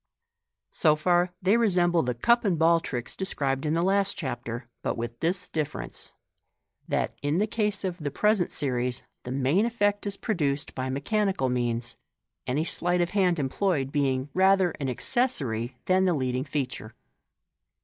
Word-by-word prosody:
So 150 - +3
far, 175 +3 +2
they 200 +5 +4
resemble 175 -6 +3
the 125 -3 -2
cup 235 - +3
and.ball 170 -4 +3
tricks 125 -7 -5
described 140 -6 -2
in 155 - +1
the 170 - +1
last 195 +1 +1
Chapter, 120 -3 -5
but - - -2
with 120 0 -5
this 180 +2 -1
difference, 155 -2 -4 0.8
that, - - -1
in 145 +3 0
the 205 - +3
case 210 -2 -1
of 185 -2 -3
the 150 -2 -2
present 210 +5 +1
series, 125 -3 -1 0.2
the 125 - -5
main 135 +9 +2
effect 205 -3 0
is 200 0 -2
produced 150 - -1
by 130 0 -3
mechanical 165 +1 0
means, 120 -1 -1 0.5
any 140 +5 0
sleight 175 +1 +1
of 175 0 0
hand 185 -4 +2
employed 140 0 0
being 135 -1 0
rather 190 -1 +4
an 135 -2 -2
accessory 130 - 0
than 185 +1 +3
the 180 -2 +2
leading 130 -1 -1
feature. 125 -6 -4
160 Hz, 155 wpm, -27 LUFS, 130-190 Hz, 0.8 s, they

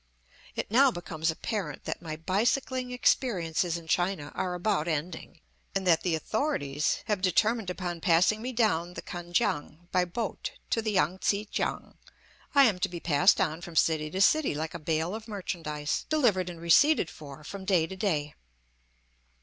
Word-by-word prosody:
It - - -4
now 265 +4 +6
becomes 165 -6 -3
apparent 160 - -3
that - - -4
my 160 -3 -5
bicycling 245 - 0
experiences 180 -9 +1
in 170 - -10
China 175 -3 0
are 180 -1 -2
about 180 -3 0
ending, 160 +1 -4 0.3
and 195 -1 0
that 170 -3 +4
the 175 -3 0
authorities 155 - -1
have 210 -4 -1
determined 215 +3 +2
upon 175 -2 -4
passing 180 +7 +3
me 250 +2 -3
down 180 -8 +1
the - - -6
Kan 175 0 -7
kiang 175 -4 -1
by 180 -1 +2
boat 205 +5 -4 0.2
to 225 - +2
the 215 -1 -2
Yang 185 -1 +1
tsi 205 +2 0
kiang. - - -3 0.6
I 280 - +8
am 210 -8 +3
to - - 0
be 175 -1 -6
passed 165 +4 +4
on 160 +2 0
from 170 -1 -9
city 155 -1 +2
to 185 +5 -2
city 300 - +4
like 155 +1 -3
a 170 - -5
bale 160 +3 -1
of 220 +1 -7
merchandise, 160 -8 -3
delivered 225 - +2
and 170 -2 -8
receipted 170 - +4
for 145 -1 -11
from 195 +5 -7
day 185 -4 +2
to 190 - -8
day. 155 -7 -1
180 Hz, 175 wpm, -28 LUFS, 160-215 Hz, 0.6 s, I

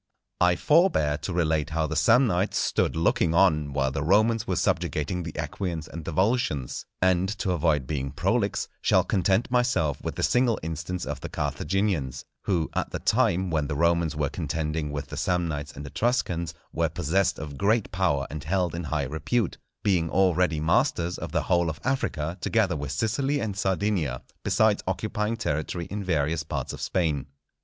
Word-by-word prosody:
I 90 0 +4
forbear 145 - +3
to 75 +5 -4
relate 80 -3 +1
how 80 0 0
the 80 - -3
Samnites 105 - +3
stood - - +1
looking 80 0 +2
on 75 -6 +3
while 70 -1 0
the 70 - -2
Romans 110 +6 +3
were 95 - 0
subjugating 85 +2 0
the 85 -2 -7
Equians 80 +1 -3
and 85 -2 -8
the - - -3
Volscians; 95 - 0 0.2
and, 95 0 +3
to 95 -1 -1
avoid 80 -5 +1
being 70 -1 -2
prolix, - - 0
shall - - +4
content 95 +5 +1
myself 120 - +1
with - - -3
the - - -3
single 125 -2 +3
instance 80 +3 -4
of 75 -2 -4
the - - -6
Carthaginians, 75 - -1 0.2
who, 85 -5 +1
at - - -1
the - - -3
time 90 +1 +1
when 75 -3 0
the 75 - -3
Romans 85 0 +2
were 75 -1 0
contending 80 -1 -2
with 70 -1 -4
the - - -6
Samnites 80 -5 -1
and 75 - -7
Etruscans, 85 - -1 0.2
were 80 0 +1
possessed 90 +4 +1
of 70 -2 -7
great 105 +2 +2
power 80 -7 +1
and 75 0 -5
held 90 +1 0
in 85 0 -4
high 75 -1 -1
repute, 85 - -1 0.2
being 90 -5 +2
already 90 -3 +2
masters 85 +2 +1
of - - -5
the - - 0
whole 85 -1 +2
of 80 - -5
Africa 90 - -1
together 105 -7 +1
with 70 -2 -4
Sicily 135 - 0
and 105 -3 -3
Sardinia, 95 -9 0 0.2
besides 110 -1 +3
occupying 105 +3 -1
territory 80 +2 -2
in 100 0 -3
various 80 -3 0
parts - - -4
of - - -8
Spain. 75 -6 0
85 Hz, 175 wpm, -26 LUFS, 75-95 Hz, 0.2 s, I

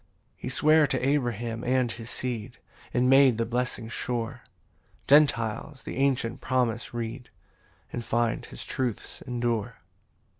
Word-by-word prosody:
3 - - -30
He - - -3
sware 155 +3 +5
to 130 - 0
Abraham 120 -5 -1
and 125 -1 +1
his 115 0 -7
seed, 120 -1 -4 0.3
And 125 +1 +2
made 135 -3 +6
the 115 - 0
blessing 120 -1 -2
sure: 120 +1 -3 0.7
Gentiles 135 -2 +3
the - - -6
ancient 135 -3 +1
promise 120 -3 0
read, 120 +1 -5 0.6
And 120 - -3
find 115 0 0
his - - -9
truths 125 -5 -3
endure. 120 -2 -1
120 Hz, 135 wpm, -27 LUFS, 115-130 Hz, 0.7 s, made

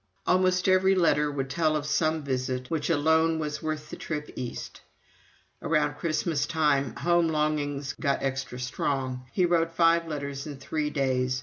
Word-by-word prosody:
Almost 185 0 +2
every 190 +1 +4
letter 150 -4 +3
would 135 -2 -3
tell 155 +2 +1
of 150 -1 -2
some 155 +1 +1
one 155 - -6
visit 130 -1 -3
which 160 -1 -1
"alone 160 +1 +3
was 150 -1 -3
worth 155 -1 -4
the - - -5
trip 150 -2 -5
East." 125 -2 -6 0.8
Around 150 -2 +1
Christmastime 155 -4 0
home 170 -1 +2
longings 145 -3 -1
got 140 - 0
extra 135 -2 -3
strong 130 0 -2
he 180 - +2
wrote 165 -1 +1
five 165 0 +4
letters 140 -2 -4
in 145 -2 -7
three 150 +2 -2
days. 130 -3 0
150 Hz, 160 wpm, -27 LUFS, 140-165 Hz, 0.8 s, every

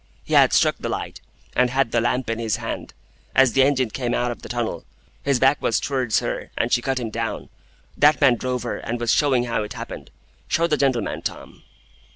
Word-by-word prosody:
He - - -6
had - - +6
struck - - +3
the - - -4
light, - - -5 0.3
and 125 0 +3
had 130 -2 +1
the 120 - +2
lamp 125 +2 0
in 115 0 -2
his 110 -3 0
hand. - - -6 0.4
As 130 -3 +5
the 135 - +4
engine 130 -4 +2
came 120 -1 -2
out 125 0 0
of 120 - -8
the - - -10
tunnel, 115 -8 -3 0.4
his 140 -3 +1
back 135 +3 +3
was 115 - +1
towards 130 -5 0
her, - - -4
and 115 - 0
she 120 - +3
cut 135 0 -1
him 115 -3 -4
down. - - -4 0.5
That 145 -2 +4
man 135 -3 +5
drove 125 +1 -2
her, 120 - -3
and 120 +1 -4
was 120 -3 +1
showing 135 -4 +3
how 115 -2 -1
it 105 - -5
happened. - - -8 0.4
Show 165 - +2
the 160 -3 +2
gentleman, 135 -5 0
Tom." - - -7
125 Hz, 215 wpm, -22 LUFS, 115-135 Hz, 0.5 s, had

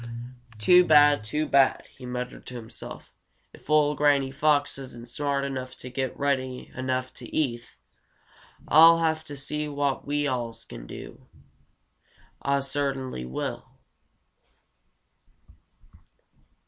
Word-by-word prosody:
"Too 180 +12 +6
bad! 145 -6 +6
Too 150 +8 -1
bad!" 135 -1 +3
he 130 -2 -10
muttered 125 0 -6
to 125 - -7
himself. 115 -2 -9 0.4
"If - - -17
ol' 150 -1 +4
Granny 145 -2 +2
Fox 145 0 +1
isn't 120 -3 -9
smart 140 +2 -1
enough 130 -2 -5
to 125 - -9
get 130 +1 -3
Reddy 130 -3 -2
enough 130 0 -2
to - - -10
eat, 120 -6 -2 0.9
Ah'll 165 +2 +8
have 160 -1 0
to 145 -2 -7
see 150 +2 -3
what 140 -2 -2
we 145 +1 0
alls 120 -4 -3
can - - -10
do. - - -10 1.1
Ah 140 0 +1
cert'nly 135 - -2
will." 65 - -4
140 Hz, 120 wpm, -26 LUFS, 130-145 Hz, 1.1 s, Ah'll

